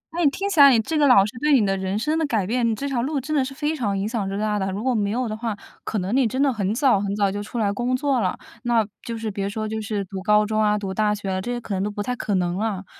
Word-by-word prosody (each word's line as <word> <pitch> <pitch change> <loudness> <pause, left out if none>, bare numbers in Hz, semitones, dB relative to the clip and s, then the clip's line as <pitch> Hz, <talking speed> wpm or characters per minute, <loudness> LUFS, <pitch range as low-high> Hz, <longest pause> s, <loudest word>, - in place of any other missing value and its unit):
那 345 - 0
你 290 - +6
听 390 +8 -3
起 385 -7 -1
来 280 - +10
你 245 -4 +5
这 315 +9 -2
个 295 -1 +4
老 200 -7 +6
师 210 - -5
对 300 +1 +2
你 210 - +2
的 195 - +1
人 190 +1 -2
生 305 +8 0
的 320 - +1
改 220 -8 0
变 240 +3 0
你 225 - 0
这 280 +6 -4
条 255 -4 -1
路 280 +3 -1
真 295 +4 -3
的 280 - +3
是 260 - -5
非 295 +3 -2
常 205 -9 -1
影 195 +2 -1
响 215 -4 -2
之 195 - -3
大 210 -1 0
的。 190 0 -1
如 200 +3 -4
果 260 0 +1
没 205 -3 0
有 245 +3 -1
的 215 - -3
话， 220 -2 -3 0.3
可 220 - -3
能 195 +6 -2
你 265 -3 +3
真 255 +4 -3
的 275 -2 +3
很 200 -3 -1
早 250 -5 +3
很 200 0 -2
早 200 -2 +1
就 205 - -4
出 215 +4 -7
来 210 -3 +1
工 245 +3 0
作 275 -1 +1
了。 185 -3 -1 0.2
那 235 -2 +2 0.2
就 230 -1 -5
是 220 -1 -4
别 200 0 -3
说 215 +1 -3
就 220 0 -3
是 205 -1 -3
读 190 0 -7
高 210 +1 +3
中 215 0 0
啊、 210 0 +3
读 195 -2 -4
大 210 0 +1
学， 190 -2 -3
这 240 +5 -4
些 240 - -2
可 220 -3 -6
能 190 - -1
都 205 - -1
不 205 0 -4
太 250 +3 -2
可 205 -4 -2
能 175 -1 0
了， 205 -3 -2
215 Hz, 355 characters per minute, -23 LUFS, 200-255 Hz, 0.3 s, 来